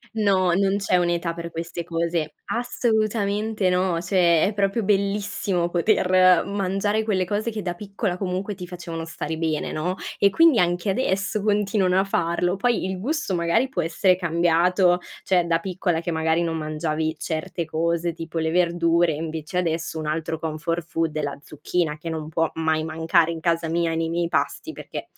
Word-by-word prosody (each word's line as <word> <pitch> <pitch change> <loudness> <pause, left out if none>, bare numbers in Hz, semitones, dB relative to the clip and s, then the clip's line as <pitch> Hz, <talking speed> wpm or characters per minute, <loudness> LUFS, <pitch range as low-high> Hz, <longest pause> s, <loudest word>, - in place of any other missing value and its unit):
No, 190 -4 +3
non 195 +1 +2
c'è 195 -2 +1
un'età 170 -1 0
per 170 0 -6
queste 170 +1 -5
cose. 165 -2 -2 0.2
Assolutamente 215 -4 0
no, 180 -2 +1
cioè 175 -2 +3
è 205 - +1
proprio 200 +2 0
bellissimo 195 -3 0
poter 185 0 +4
mangiare 200 +2 0
quelle 190 -4 0
cose 210 +4 -1
che 215 -2 -5
da 175 -1 -2
piccola 195 0 -3
comunque 190 +2 -3
ti 180 -2 -8
facevano 170 -2 -6
stare 160 -1 -5
bene, 160 -2 -1
no, 175 +4 -2 0.2
e 200 - +5
quindi 320 - +5
anche 175 +2 +1
adesso 195 -1 0
continuano 205 -2 +2
a - - +3
farlo. 175 -1 0
Poi 235 0 +1
il 190 0 -3
gusto 285 - -2
magari 175 +10 +1
può 180 - -1
essere 175 +3 +2
cambiato, 175 +1 +2 0.2
cioè 180 -2 +2
da 165 -1 +3
piccola, 175 -1 -1
che 170 +1 -3
magari 160 +1 +1
non 165 -1 -1
mangiavi 155 0 -2
certe 160 +2 -3
cose, 170 +2 -1
tipo 165 0 -7
le 160 0 0
verdure 170 -1 +2
e - - -4
invece 160 +2 -5
adesso 165 -2 -1
un 155 - -4
altro 160 +1 -2
comfort 165 +2 -3
food 165 -2 -1
è 155 - -1
la 140 -1 -4
zucchina, 150 +2 -2
che 165 +2 -6
non 155 -1 -5
può 165 0 0
mai 160 -1 0
mancare 160 +1 +2
in 165 - -5
casa 165 0 0
mia, 165 0 0
nei 165 0 -1
miei 170 0 0
pasti, - - -2
perchè - - -7
175 Hz, 175 wpm, -24 LUFS, 165-195 Hz, 0.2 s, e